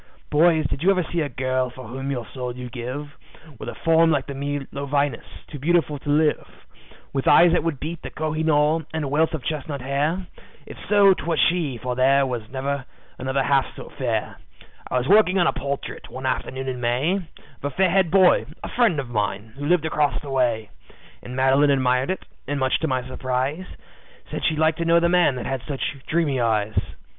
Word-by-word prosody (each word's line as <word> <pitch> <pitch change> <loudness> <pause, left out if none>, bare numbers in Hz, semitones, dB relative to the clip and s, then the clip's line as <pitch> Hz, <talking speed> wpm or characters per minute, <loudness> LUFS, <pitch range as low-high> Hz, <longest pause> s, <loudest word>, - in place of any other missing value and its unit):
"Boys, 160 0 +4
did 135 - -2
you 185 - +3
ever 185 -2 +3
see 170 +1 -2
a 145 - -1
girl 130 0 -1
for 130 -1 -11
whom 135 +4 -5
your 125 -4 -3
soul 125 -2 -4
you'd 125 -1 -7
give, 130 +4 -6 0.4
With - - -6
a - - -7
form 165 0 +3
like 140 -4 +1
the 140 - -6
Milo 140 0 -4
Venus, 140 -3 0 0.2
too 145 - -9
beautiful 155 -1 +1
to 145 - -7
live; 150 +1 0 0.5
With 135 -1 -2
eyes 175 0 +7
that 175 - +2
would 165 -5 -2
beat 165 +2 -5
the - - -6
Koh 155 0 -3
i 155 - -2
noor, 155 +1 +2
and 160 - -1
a - - -2
wealth 160 +4 +1
of 145 - -7
chestnut 145 -1 -3
hair? 145 +8 -1 0.4
If - - -10
so, 200 -2 +6
'twas 165 -3 -2
she, 165 -8 +1
for 125 +2 -4
there 135 +2 +4 0.2
never 135 +1 -2
was - - -11 0.4
another 130 +1 0
half 140 0 +1
so - - -9
fair. - - -3 0.5
"I - - 0
was 125 +1 -1
working 195 -1 +5
on 175 - +4
a - - +2
portrait, 140 +1 -5
one 130 +1 -7
afternoon 130 +1 -2
in 125 -1 -4
May, 130 +10 +1
Of 170 -5 -12
a - - +1
fair 180 +5 +2
haired 190 -2 +3
boy, 185 +1 +4 0.2
a - - -4
friend 230 - +2
of 135 - -4
mine, 105 -1 -3
who 145 +1 -4
lived 175 -1 +3
across 150 -2 +1
the 140 - -7
way. 120 -5 0 0.5
And 125 - -8
Madeline 135 +2 +4
admired 130 0 +2
it, 190 - -3 0.2
and 145 0 -2
much 130 -1 +1
to 160 - -1
my 130 -2 -1
surprise, 130 +7 -2 0.6
Said - - -4
she'd 155 - +1
like 160 +1 +2
to 170 - -2
know 170 +1 +5
the 170 0 +2
man 175 -6 +3
that 125 - -5
had 135 -2 -2
such 140 -1 -3
dreamy 155 -5 +1
eyes. 110 -2 +1
140 Hz, 210 wpm, -23 LUFS, 130-160 Hz, 0.6 s, eyes